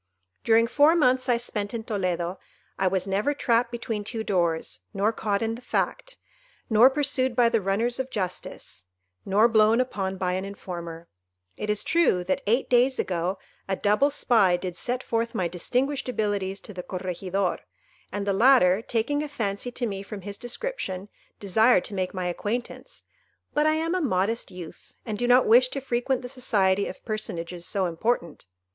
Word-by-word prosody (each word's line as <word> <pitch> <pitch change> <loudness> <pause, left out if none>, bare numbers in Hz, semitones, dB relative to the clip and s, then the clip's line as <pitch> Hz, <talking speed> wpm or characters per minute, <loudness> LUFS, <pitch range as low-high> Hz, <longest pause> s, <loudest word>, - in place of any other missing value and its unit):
"During 230 0 +4
four 290 +7 +4
months 255 -4 +2
I 240 - +4
spent 215 -2 -3
in 225 - -4
Toledo, 185 -5 -2 0.4
I 190 - +2
was 185 0 0
never 205 +9 0
trapped 235 -3 +1
between 225 -3 -4
two 220 +1 -4
doors, 170 - 0 0.2
nor 205 +3 +1
caught 205 -1 -1
in 225 0 -1
the 235 - -8
fact, - - -2 0.5
nor 225 +4 +7
pursued 265 -3 0
by 235 -1 +4
the 230 -2 +1
runners 225 +6 0
of 265 0 -2
justice, 185 - -5 0.4
nor 205 +4 +5
blown 220 0 +4
upon 195 -7 -2
by 180 -1 -1
an 185 +1 -2
informer. 170 -4 -7 0.5
It 210 - -5
is 210 0 +1
true 330 - +2
that, 185 +1 -1
eight 235 +5 +2
days 250 +2 +3
ago, 180 +1 -1 0.3
a 195 - 0
double 210 +9 +2
spy 220 -10 +3
did 180 -1 -5
set 250 +6 -3
forth 230 +1 -2
my 185 -5 0
distinguished 255 +11 -1
abilities 205 -4 -1
to 210 - -9
the 180 - -5
Corregidor, 185 +1 -2 0.5
and 205 -1 -3
the 200 - +1
latter, 215 -3 +5
taking 240 +6 -1
a 300 - -3
fancy 215 -2 -3
to 245 - -2
me 195 -3 -4
from 200 0 -8
his 200 +1 -8
description, 240 - -4 0.3
desired 220 +1 +4
to - - -8
make 185 -2 -2
my 185 -2 -4
acquaintance; 235 - -4 0.5
but 300 +1 +3
I 310 - +3
am 325 +2 -1
a 370 - 0
modest 225 - 0
youth, 180 -3 -11
and 220 - -3
do 245 +3 -1
not 250 +1 +5
wish 250 +3 +6
to 275 - -4
frequent 255 0 -1
the - - -5
society 205 -7 +1
of - - -9
personages 175 -6 -4
so 195 -2 0
important. 170 - -2
215 Hz, 175 wpm, -26 LUFS, 190-245 Hz, 0.5 s, nor